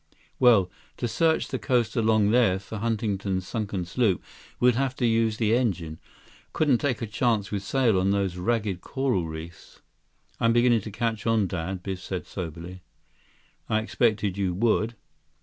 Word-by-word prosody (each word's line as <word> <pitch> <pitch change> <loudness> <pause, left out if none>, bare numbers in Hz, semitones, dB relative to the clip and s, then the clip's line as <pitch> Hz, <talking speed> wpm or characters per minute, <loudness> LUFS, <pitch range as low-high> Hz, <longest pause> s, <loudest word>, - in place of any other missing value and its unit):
"Well, 110 -8 +5 0.3
to 120 - -2
search 160 +8 +1
the - - -3
coast 125 -4 0
along 110 -3 +3
there 115 -6 +4
for 100 +2 -7
Huntington's 100 -4 -1
sunken 100 -5 -3
sloop, 95 +1 0 0.4
we'd 125 0 +5
have 130 +1 -1
to 125 - 0
use 115 -1 +2
the 110 -1 +2
engine. 90 -10 -1 0.5
Couldn't 140 -6 +2
take 130 -5 -1
a - - 0
chance 110 -2 0
with 100 -2 -2
sail 115 -1 +2
on 95 +1 +1
those 100 -2 0
ragged 100 -1 -1
coral 130 -11 -1
reefs." 80 +2 -10 0.6
"I'm 115 0 +3
beginning 120 -1 +4
to 105 - -8
catch 115 +1 -2
on, 115 -2 +3
Dad," 90 0 -4
Biff 95 -2 -4
said 90 0 -5
soberly. 90 +1 -7 0.9
"I 110 - +2
expected 110 -3 0
you 95 -3 0
would." 115 +2 +1
110 Hz, 160 wpm, -26 LUFS, 95-120 Hz, 0.9 s, Well